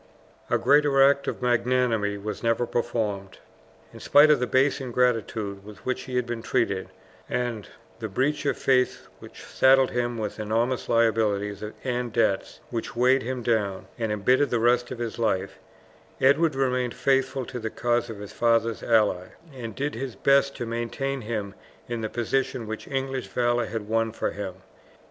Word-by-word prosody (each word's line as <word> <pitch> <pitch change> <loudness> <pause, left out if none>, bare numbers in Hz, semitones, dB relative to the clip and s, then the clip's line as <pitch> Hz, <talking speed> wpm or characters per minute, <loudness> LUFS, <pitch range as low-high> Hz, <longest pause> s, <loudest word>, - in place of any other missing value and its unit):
A - - +3
greater 145 -1 +3
act 140 0 +3
of - - -3
magnanimity 120 -4 +1
was 105 +1 -5
never 115 +1 +1
performed. 110 -5 -2 0.6
In - - -11
spite 150 +2 +6
of 150 - +4
the 125 - -1
base 135 +3 +2
ingratitude 115 -5 -1
with 105 0 -13
which 130 - -2
he 130 - -6
had 125 -1 +1
been 120 -1 -4
treated, 100 -7 -1 0.4
and 120 -4 -2 0.3
the 110 - -3
breach 135 +9 0
of 140 - 0
faith 130 -1 +1
which - - -12
saddled 130 0 +4
him 120 -1 -1
with 110 0 -4
enormous 115 +4 -1
liabilities 110 -3 +1 0.2
and 125 -2 -2
debts, 105 -4 0
which 115 -1 -4
weighed 130 +2 +4
him 125 0 -4
down 105 -5 0
and 110 -2 -1
embittered 125 +7 +2
the 120 - +1
rest 120 +1 +2
of 130 - -6
his 115 -1 -5
life, 95 -4 -1 0.6
Edward 145 +3 +3
remained 125 -2 0
faithful 135 -1 +1
to 125 - -6
the 110 -1 -3
cause 120 +1 0
of 110 - -6
his 100 0 -9
father's 115 -2 +1
ally, 105 -5 +2 0.3
and 115 -5 -7
did 145 +2 -2
his 125 -1 -5
best 140 +5 +3
to 120 - -3
maintain 120 +4 -3
him 105 -3 -4 0.3
in 120 -1 -3
the 110 - -3
position 125 +1 -1
which 110 0 -6
English 135 -1 -3
valour 120 -1 0
had 110 -2 -5
won 115 0 +1
for - - -2
him. 100 -3 -6
120 Hz, 170 wpm, -25 LUFS, 110-130 Hz, 0.6 s, spite